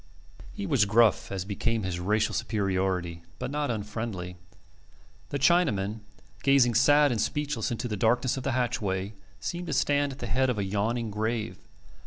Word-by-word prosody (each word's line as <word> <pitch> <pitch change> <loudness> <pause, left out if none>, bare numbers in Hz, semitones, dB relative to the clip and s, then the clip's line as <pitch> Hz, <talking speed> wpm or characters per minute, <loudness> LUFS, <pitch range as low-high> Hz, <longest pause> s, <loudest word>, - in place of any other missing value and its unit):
He 205 -2 -5
was 140 - +3
gruff, 110 +2 +3
as 95 -2 -3
became 110 +2 -1
his 90 -2 -3
racial 105 +4 +1
superiority, 95 -5 -1 0.2
but - - -4
not 150 0 -1
unfriendly. 105 -4 -4 0.9
The 140 - -2
Chinaman, 125 - +2 0.4
gazing 135 -3 +4
sad 145 +4 +5
and 115 -3 0
speechless 145 -6 -1
into 120 +1 -3
the 105 - -3
darkness 120 +5 +2
of 135 - -4
the 130 0 -1
hatchway, 110 -6 -1 0.3
seemed 175 0 -4
to 155 - -2
stand 145 +1 +2
at 135 - -9
the 125 - -5
head 130 +3 +1
of 125 - -1
a 100 - 0
yawning 105 +4 -1
grave. 110 +1 -2
115 Hz, 165 wpm, -28 LUFS, 100-135 Hz, 0.9 s, sad